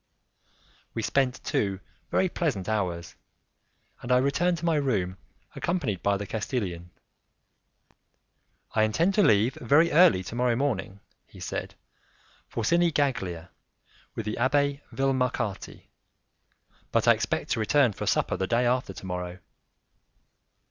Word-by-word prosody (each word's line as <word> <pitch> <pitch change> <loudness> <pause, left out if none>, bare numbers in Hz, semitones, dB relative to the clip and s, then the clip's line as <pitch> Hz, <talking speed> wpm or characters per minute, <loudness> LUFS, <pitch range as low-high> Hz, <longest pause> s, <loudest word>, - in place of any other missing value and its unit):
We 110 - -2
spent 135 +2 0
two 95 -2 -1 0.3
very 190 - +2
pleasant 145 - -2
hours, 90 -6 -2 0.9
and 120 - -4
I 125 - +6
returned 165 +7 +1
to 165 - -5
my 165 -2 +2
room 100 -10 0 0.4
accompanied 140 - -2
by 100 0 +2
the 100 - -5
Castilian. 100 -6 -3 1.8
"I 110 - +2
intend 160 - +2
to 210 - +3
leave 110 - +4
very 150 +7 +4
early 150 - +5
to 100 - -8
morrow 120 0 +1
morning," 105 -7 -2 0.3
he - - -15
said, - - -5 0.7
"for 115 - -3
Sinigaglia, 130 - +1 0.7
with 115 - -4
the 105 - -3
Abbé 140 +2 +1
Vilmarcati, 125 -6 -1 1.1
but - - +1
I - - +9
expect - - -2
to - - +1
return 125 +1 +3
for - - -5
supper - - +1
the 95 - -2
day 120 +3 +2
after 125 -4 0
to 95 - -10
morrow." 90 -1 -4
120 Hz, 130 wpm, -27 LUFS, 100-140 Hz, 1.8 s, I